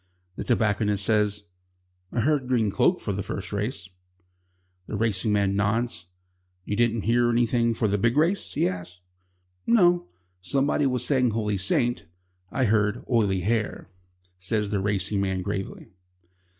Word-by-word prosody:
The -, -, -5 dB
tobacconist 105 Hz, -4 st, +1 dB
says: 105 Hz, -2 st, +1 dB, 0.7 s
"I 120 Hz, -, 0 dB
heard 140 Hz, -1 st, +1 dB
Green 115 Hz, -5 st, +1 dB
Cloak 175 Hz, -, +2 dB
for 105 Hz, -, -3 dB
the 100 Hz, -, -3 dB
first 95 Hz, 0 st, -6 dB
race," 105 Hz, -2 st, -3 dB, 1.0 s
The -, -, -4 dB
racing 110 Hz, -1 st, +1 dB
man 100 Hz, -1 st, +1 dB
nods. 100 Hz, -3 st, -1 dB, 0.6 s
"You 105 Hz, -, -2 dB
didn't 115 Hz, -1 st, +1 dB
hear 120 Hz, +1 st, +2 dB
anything 115 Hz, 0 st, +2 dB
for 110 Hz, -, 0 dB
the 100 Hz, 0 st, 0 dB
big 115 Hz, +6 st, +1 dB
race?" 175 Hz, +6 st, +1 dB
he -, -, +2 dB
asks. 90 Hz, -1 st, -6 dB, 0.7 s
"No. 175 Hz, -6 st, +4 dB, 0.3 s
Somebody 140 Hz, +5 st, +1 dB
was 125 Hz, -2 st, 0 dB
saying 130 Hz, -4 st, +2 dB
Holy 105 Hz, -2 st, -1 dB
Saint." 120 Hz, +5 st, 0 dB, 0.4 s
"I 130 Hz, -, 0 dB
heard 105 Hz, +1 st, +1 dB
Oily 105 Hz, -6 st, +1 dB
Hair," 105 Hz, -1 st, -2 dB, 0.5 s
says 105 Hz, +2 st, -1 dB
the 100 Hz, -, 0 dB
racing 100 Hz, 0 st, 0 dB
man 95 Hz, -1 st, -1 dB
gravely. 95 Hz, +1 st, -5 dB
110 Hz, 145 wpm, -25 LUFS, 100-120 Hz, 1.0 s, No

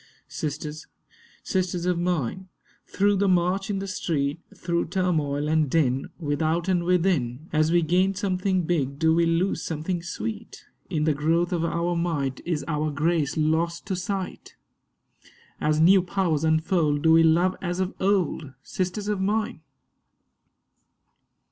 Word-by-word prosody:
Sisters, 150 Hz, +1 st, -5 dB, 0.6 s
sisters 180 Hz, -2 st, -1 dB
of 180 Hz, -1 st, +1 dB
mine, 180 Hz, +1 st, -2 dB, 0.4 s
through 205 Hz, +1 st, +2 dB
the 200 Hz, +1 st, +2 dB
march 185 Hz, +2 st, +1 dB
in 200 Hz, -, -1 dB
the 195 Hz, -, -3 dB
street, 150 Hz, -5 st, -2 dB, 0.2 s
Through 170 Hz, -1 st, -1 dB
turmoil 155 Hz, -5 st, 0 dB
and 155 Hz, -2 st, +2 dB
din, 135 Hz, -4 st, +1 dB
without, 160 Hz, +2 st, -1 dB
and 180 Hz, -2 st, +1 dB
within, 165 Hz, -7 st, +1 dB
As 155 Hz, +1 st, +2 dB
we 175 Hz, 0 st, +3 dB
gain 185 Hz, +4 st, +2 dB
something 185 Hz, -1 st, 0 dB
big 140 Hz, -5 st, -1 dB
do 160 Hz, +1 st, +3 dB
we 170 Hz, 0 st, +3 dB
lose 170 Hz, +4 st, +1 dB
something 165 Hz, +2 st, -3 dB
sweet? 215 Hz, +5 st, -6 dB, 0.2 s
In 155 Hz, -5 st, -1 dB
the 155 Hz, 0 st, +2 dB
growth 165 Hz, +5 st, +1 dB
of 170 Hz, -2 st, 0 dB
our 170 Hz, +1 st, -1 dB
might 145 Hz, -6 st, -1 dB
is 165 Hz, -4 st, -1 dB
our 155 Hz, -1 st, -1 dB
grace 155 Hz, 0 st, 0 dB
lost 160 Hz, +2 st, 0 dB
to 195 Hz, -2 st, -2 dB
sight? 185 Hz, +1 st, -5 dB, 1.0 s
As 155 Hz, 0 st, +1 dB
new 185 Hz, +4 st, +6 dB
powers 180 Hz, -4 st, -1 dB
unfold 160 Hz, -2 st, +1 dB
do 160 Hz, -, +5 dB
we 165 Hz, 0 st, +7 dB
love 170 Hz, +3 st, +3 dB
as 175 Hz, 0 st, -3 dB
of 185 Hz, 0 st, -1 dB
old, 180 Hz, -7 st, 0 dB
Sisters 185 Hz, +3 st, -3 dB
of 210 Hz, -2 st, -1 dB
mine? 210 Hz, +3 st, -1 dB
170 Hz, 145 wpm, -25 LUFS, 155-185 Hz, 1.0 s, we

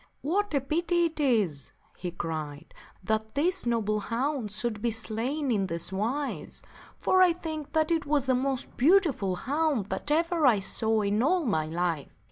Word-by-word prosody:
" -, -, -44 dB
What 375 Hz, +3 st, 0 dB
a 280 Hz, -, +2 dB
pity 340 Hz, +5 st, +1 dB
it 325 Hz, -1 st, -3 dB
is," 210 Hz, -, +1 dB, 0.2 s
he 180 Hz, -, -5 dB
cried, 155 Hz, -4 st, -5 dB, 0.3 s
"that 220 Hz, +3 st, -1 dB
this 350 Hz, +1 st, +1 dB
noble 215 Hz, -3 st, +1 dB
hound 240 Hz, +1 st, -2 dB
should 215 Hz, 0 st, -3 dB
be 235 Hz, -, +1 dB
slain 235 Hz, +6 st, -2 dB
in 200 Hz, -4 st, +1 dB
this 170 Hz, +1 st, -4 dB
wise; 235 Hz, +9 st, -3 dB, 0.3 s
for 375 Hz, -, +3 dB
I 360 Hz, -2 st, +6 dB
think 315 Hz, -4 st, -6 dB
that 315 Hz, 0 st, +2 dB
it 325 Hz, -3 st, 0 dB
was 285 Hz, -2 st, +2 dB
the 260 Hz, -, +2 dB
most 260 Hz, 0 st, -2 dB
beautiful 280 Hz, -, +3 dB
hound 275 Hz, -, -1 dB
that -, -, -3 dB
ever 330 Hz, 0 st, +2 dB
I 235 Hz, -4 st, +5 dB
saw 220 Hz, +2 st, +1 dB
in 205 Hz, +1 st, +1 dB
all 335 Hz, +5 st, +2 dB
my 160 Hz, -9 st, 0 dB
life. 165 Hz, -2 st, -2 dB
250 Hz, 175 wpm, -28 LUFS, 210-310 Hz, 0.3 s, I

